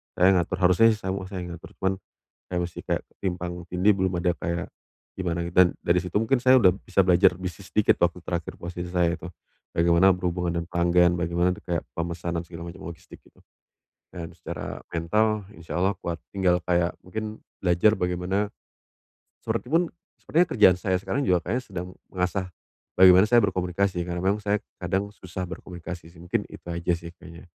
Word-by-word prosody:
Saya 90 - +5
yang 95 - +4
ngatur, 85 +1 -2
harusnya 90 +5 +6
sih 105 - -7
semuanya 95 0 -2
saya - - -3
yang 90 - -7
ngatur, - - -13
cuman 95 0 +2 0.6
saya 90 - -1
mesti 85 0 -4
kayak - - -1
ketimpang 90 -2 -3 0.2
tindih, 95 +4 +4
belum 95 -1 0
ada 90 0 +2
kayak 85 -1 -3 0.5
gimana 85 -2 -2
gitu, 85 - -8
dan 90 - +7 0.2
dari 90 - +3
situ 90 0 -5
mungkin 115 +4 +2
saya 130 +1 +7
sudah 95 -7 +6
bisa 95 - -1
belajar 90 0 +5
bisnis 95 +1 -7
dikit 105 +2 +3
waktu 85 +1 +2
terakhir 85 -1 -3
posisi 90 0 -6
saya 90 -1 +2
itu. 90 - -8 0.5
Bagaimana 85 +2 +5
berhubungan 90 -1 -1
dengan 85 +1 -5
pelanggan, 85 0 +4
bagaimana 85 +1 +1
de - - -13
kayak 85 -2 -2
pemesanan 85 0 -3
segala 85 0 -8
macam, 95 - -13
logistik, 85 -1 -11
gitu. - - -24 0.7
Dan 85 -1 -7
secara 85 -1 -6
mental 105 +5 +1
insyaallah 90 +4 -1
kuat, 85 -1 -3 0.2
tinggal 90 -2 +3
kayak 85 -1 +1
mungkin 110 +3 -5 0.2
belajar 90 +4 +4
bagaimana 90 +3 -1 0.9
seperti - - -3
pun, 170 0 +3 0.3
sepertinya 175 +3 +2
kerjaan 95 -5 +6
saya 95 0 0
sekarang 140 +8 -1
juga 90 -2 +3
kayaknya 120 +7 -1
sedang 90 -2 -6 0.2
mengasah 90 0 -1 0.5
bagaimana 95 0 +8
saya 120 - +7
berkomunikasi, 90 0 0
karena 90 0 -4
memang 100 +3 +1
saya 105 0 +1 0.2
kadang 95 +3 -1
susah 90 -2 -6
berkomunikasi, 85 -2 -8
sih. 85 - -19
Mungkin 90 +1 -1
itu - - -12
aja 85 0 -1
sih 85 0 -10
kayaknya, 85 -1 -13
90 Hz, 180 wpm, -26 LUFS, 85-95 Hz, 0.9 s, bagaimana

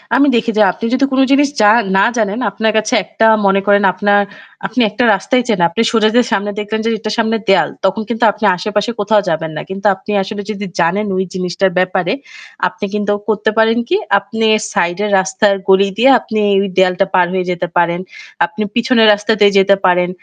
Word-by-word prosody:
আমি 280 +3 +3
দেখি 230 0 0
যে - - +4
আপনি 230 - -7
যদি 275 +1 +2
কোন 265 - 0
জিনিস 280 0 +3
যা 205 - +5 0.3
না 195 - +4
জানেন 215 +1 -1
আপনার 220 +2 -1
কাছে 215 0 -1
একটা 225 - -1 0.2
মনে 195 0 +3
করেন 205 0 +3
আপনার 205 +2 +2 0.5
আপনি 255 - -2
একটা 215 +4 -2
রাস্তায় 245 +6 0
চেনেন 215 - +1
আছেন - - +4
আপনি 170 - -2
সোজা 220 -2 +2
যে 245 - +5
সামনে 205 -1 -1
দেখলেন 215 +1 -3
যে - - +1
এটার 215 0 -4
সামনে 225 0 0
দেয়াল 195 - +3 0.2
তখন 195 +4 0
কিন্তু 235 0 -2
আপনি 215 +1 -5
আশেপাশে 210 +4 -2
কোথাও 205 0 +2
যাবেন 160 0 -3
না। - - -4
কিন্তু 195 +2 -8
আপনি 195 +2 -9
আসলে 205 +1 -6
যদি 205 -1 -6
জানেন 185 +5 +1
ওই 190 - 0
জিনিসটার 185 +1 -1
ব্যাপারে 185 0 0 0.5
আপনি 205 - -6
কিন্তু 205 0 -1 0.2
করতে 215 0 0
পারেন 225 +1 +3
কি - - +2 0.2
আপনি 225 +3 -4 0.3
সাইডের 175 +5 -1
রাস্তার 190 +2 +1 0.2
গলি 195 +1 +4
দিয়ে 255 +4 +4
আপনি 220 0 -4 0.2
ওই 200 - -2
দেয়ালটা 185 +1 +2
পার 180 -1 +4
হয়ে 185 -1 -1
যেতে 180 0 -3
পারেন। 170 0 +1 0.5
আপনি 215 +3 -8
পিছনের 230 -1 +3
রাস্তা 205 +2 -2
দিয়ে 205 -1 +5
যেতে 195 +1 +4
পারেন। 180 -1 +2
205 Hz, 200 wpm, -15 LUFS, 190-220 Hz, 0.5 s, যা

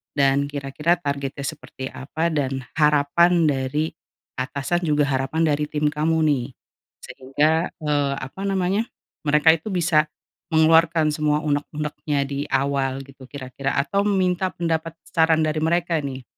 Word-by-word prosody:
dan 140 0 +3
kira-kira 145 +4 0
targetnya 140 -3 -4
seperti 130 -1 -6
apa, 160 +5 -2
dan 135 -3 -1 0.2
harapan 150 +4 +4
dari 145 +2 0 0.5
atasan 140 +6 -1
juga 150 -1 +3
harapan 135 +3 0
dari 150 -1 +1
tim 150 0 0
kamu 155 +2 +1
nih. 140 -5 +1 0.6
Sehingga, 150 +5 0 0.2
eee, 145 -2 +1
apa 135 +9 -8
namanya, 195 +3 0 0.4
mereka 150 +2 +6
itu 160 +4 -2
bisa 165 -4 +2 0.5
mengeluarkan 160 0 +4
semua 150 0 0
uneg-unegnya 150 0 -2
di 140 +1 -3
awal 135 0 0
gitu 135 -1 -14
kira-kira 135 0 -4
atau 140 +9 +1
meminta 185 -2 +1
pendapat, 165 -1 -2
saran, 160 -2 +3
dari 155 0 0
mereka 170 +1 +1
nih. 135 -3 -5
150 Hz, 130 wpm, -23 LUFS, 140-160 Hz, 0.6 s, mereka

